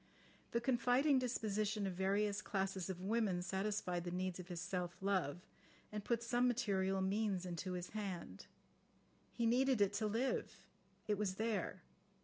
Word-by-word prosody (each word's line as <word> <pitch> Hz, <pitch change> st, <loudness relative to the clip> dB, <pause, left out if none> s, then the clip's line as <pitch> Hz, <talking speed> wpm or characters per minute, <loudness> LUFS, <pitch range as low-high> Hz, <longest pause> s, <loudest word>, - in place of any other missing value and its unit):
The 235 Hz, -, +1 dB
confiding 255 Hz, +3 st, +3 dB
disposition 215 Hz, -4 st, 0 dB
of 190 Hz, -, -1 dB
various 200 Hz, +3 st, +1 dB
classes 195 Hz, -2 st, -1 dB
of 185 Hz, -1 st, -4 dB
women 200 Hz, -4 st, +1 dB
satisfied 190 Hz, -2 st, -1 dB
the 175 Hz, -, -3 dB
needs 185 Hz, +1 st, -2 dB
of 180 Hz, -, -7 dB
his 175 Hz, -3 st, -4 dB
self 180 Hz, 0 st, -3 dB
love, 185 Hz, -4 st, 0 dB, 0.5 s
and 210 Hz, -1 st, -4 dB
put 235 Hz, +1 st, 0 dB
some 245 Hz, +1 st, +3 dB
material 195 Hz, -6 st, +1 dB
means 195 Hz, -1 st, +1 dB
into 180 Hz, +1 st, -3 dB
his 180 Hz, 0 st, -4 dB
hand. 185 Hz, -, -5 dB, 0.8 s
He 235 Hz, -, -1 dB
needed 255 Hz, +1 st, +4 dB
it 200 Hz, 0 st, +4 dB
to 215 Hz, -, +2 dB
live. 230 Hz, +5 st, 0 dB, 0.5 s
It 210 Hz, -1 st, +1 dB
was 195 Hz, -3 st, 0 dB
there. 220 Hz, -3 st, -1 dB
200 Hz, 150 wpm, -39 LUFS, 185-225 Hz, 0.8 s, needed